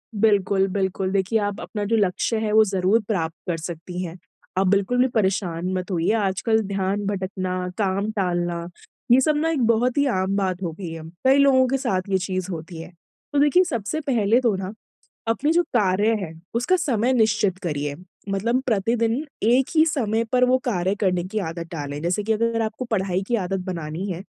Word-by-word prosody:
बिल्कुल, 200 -2 +3
बिल्कुल। 190 -1 -1
देखिए 195 +3 +1
आप 205 0 -2
अपना 210 -2 -4
जो 225 +3 +1
लक्ष्य 205 +2 +1
है 220 -1 -1
वो 220 0 +7
ज़रूर 195 +3 +2
प्राप्त 165 -7 -1
कर 170 -2 -1
सकती 170 +2 -6
हैं। 170 0 -6 0.4
आप 190 0 +3
बिल्कुल 200 +5 +2
भी 255 - +5
परेशान 190 -6 -1
मत 185 +1 -3
होइए। 170 0 +1
आजकल 220 +1 +1
ध्यान 200 +1 -1
भटकना, 185 -2 -2
काम 200 0 0
टालना 175 -4 -1 0.4
ये 250 - +8
सब 305 +3 +2
ना 320 +2 +1
एक 300 -5 0
बहुत 235 +3 +2
ही 285 - +4
आम 190 -6 0
बात 190 -2 -1
हो 170 - -2
गयी 175 -4 -5
है। 165 -1 -7 0.2
कई 270 +1 +6
लोगों 270 -2 +5
के 270 +2 +1
साथ 190 -7 -2
ये 190 - +3
चीज़ 185 0 -3
होती 165 0 -7
है। 165 - -10 0.4
तो 285 - +3
देखिए 295 +6 +5
सबसे 265 - -3
पहले 230 -2 +3
तो 230 -5 +2
ना 190 +1 -5 0.5
अपने 270 +7 +1
जो 345 +1 +3
कार्य 210 - +2
है 165 -4 -5 0.2
उसका 245 +10 +2
समय 260 - +1
निश्चित 215 -5 +2
करिए। 145 -4 -2 0.3
मतलब 230 +6 0
प्रतिदिन, 230 +4 +1 0.2
एक 245 +4 +4
ही 315 0 +6
समय 230 -8 0
पर 250 0 +3
वो 255 +1 +3
कार्य 190 -5 0
करने 180 -3 +1
की 215 - +1
आदत 165 0 -6
डालें। 145 -3 -5
जैसे 175 +5 0
कि 220 +2 +1
अगर 230 +1 0
आपको 220 +3 -3
पढ़ाई 190 -5 -1
की 240 - +1
आदत 195 -2 -2
बनानी 165 0 -4
है, 175 0 -5
200 Hz, 195 wpm, -23 LUFS, 185-230 Hz, 0.5 s, ये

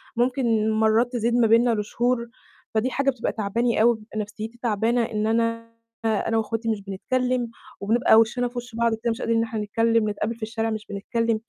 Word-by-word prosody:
ممكن 235 -3 +1
مرات 220 +3 +2
تزيد 235 0 0
ما 235 -2 +4
بينّا 230 +1 +4
لشهور، 235 +3 -1 0.5
فدي 230 +4 +1
حاجة 275 0 +1
بتبقى 255 -3 -1
تعباني 225 +2 0
أوي، 235 0 +5
بتبقى 215 0 -8
نفسيتي 215 +3 -6
تعبانة 230 +1 +1
إن 215 -2 -1
أنا 230 0 0 0.7
وإخواتي 225 +1 -2
مش 215 -2 -1
بنتكلِّم، 245 +5 -1 0.3
وبنبقى 220 +3 +3
وشنا 245 +2 +1
في 245 0 -10
وش 245 -1 -6
بعض 235 -1 +2
كده 230 +1 -2
مش 225 - -5
قادرين 230 0 +1
إن 225 - +2
إحنا 220 -1 -4
نتكلِّم، 225 +1 +1
نتقابل 210 +2 -2
في 230 - -10
الشارع 225 0 -2
مش 215 -1 -4
بنتكلِّم، 225 +2 -1
230 Hz, 185 wpm, -24 LUFS, 220-240 Hz, 0.7 s, أوي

